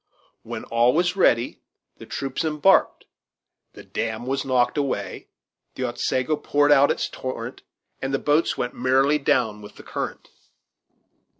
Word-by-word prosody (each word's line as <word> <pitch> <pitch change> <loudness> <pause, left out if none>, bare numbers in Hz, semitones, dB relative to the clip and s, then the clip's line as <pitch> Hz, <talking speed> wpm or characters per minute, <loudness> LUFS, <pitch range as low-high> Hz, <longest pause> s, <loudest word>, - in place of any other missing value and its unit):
When - - -7
all 120 +2 +2
was 175 +2 +2
ready 120 -11 +2 0.4
the - - -12
troops 135 +2 -3
embarked, 160 +5 +2 0.7
the - - -12
damn 110 +1 -4
was 135 +1 -1
knocked 125 -2 +1
away, 140 -2 -3 0.5
the 130 - -4
Otsego 125 +4 -1
poured 145 0 +2
out 140 0 +6
its - - 0
torrent, 130 0 -6 0.4
and 135 - -2
the 135 - +1
boats 150 +4 +1
went 125 - -2
merrily 135 +4 +2
down 110 -6 +1
with 105 - -12
the - - -13
current. - - -5
135 Hz, 140 wpm, -23 LUFS, 125-145 Hz, 0.7 s, out